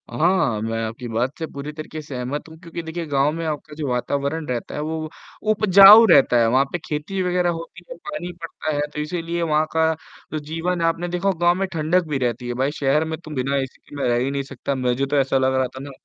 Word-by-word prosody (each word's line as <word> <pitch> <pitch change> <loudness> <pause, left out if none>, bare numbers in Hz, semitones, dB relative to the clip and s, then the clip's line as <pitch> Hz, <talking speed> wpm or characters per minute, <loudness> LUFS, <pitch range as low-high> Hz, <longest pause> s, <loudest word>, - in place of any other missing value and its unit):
हाँ, 165 - +1
मैं 115 +1 -2
आपकी 115 +2 -5
बात 120 +4 -2
से 160 - -2
पूरी 140 +1 -7
तरीक़े 155 0 -7
से 145 -3 -8
सहमत 125 +5 -4
हूँ 160 - -13
क्योंकि 170 -1 -7
देखिए 165 +1 -5
गाँव 140 0 +2
में 165 +1 -4
आपका 150 -1 -4
जो 150 -2 -3
वातावरण 140 +5 -1
रहता 125 -2 -4
है - - -3
वो 155 0 -3 0.4
उपजाऊ 205 +1 +9
रहता 135 -7 +6
है, 115 -1 +4
वहाँ 130 +3 +3
पे - - -1
ख़ेती 155 +6 -3
वग़ैरह 180 -1 +1
होती 165 -1 -6
है, - - -7
पानी 180 -13 -6
पड़ता 160 -1 -4
है 145 - 0
तो - - -4
इसीलिए 170 +2 -3
वहाँ 155 -2 +2
का 160 0 +3 0.4
जो 155 - -2
जीवन 165 +4 -3
आपने 165 +1 0
देखा 180 +2 -2
होगा 175 -3 0
गाँव 175 0 +5
में 195 - 0
ठंडक 165 +2 +1
भी 150 -2 -1
रहती 125 -1 -2
है, 120 - -2
भाई 135 +3 0
शहर 145 +3 +2
में 160 0 -4
तो 155 -2 -11
बिना 135 +2 -1
एसी 135 -1 -3
के - - -11
मैं 140 - -1
रह 120 - +2
ही 135 - -1
नहीं 140 0 -2
सकता, 135 +1 -4
मुझे 130 +1 0
तो 145 +1 0
ऐसा 135 -1 +2
लग 130 0 +2
रहा 130 -1 +2
था - - -7
ना 140 - -8
150 Hz, 245 wpm, -22 LUFS, 135-165 Hz, 0.4 s, उपजाऊ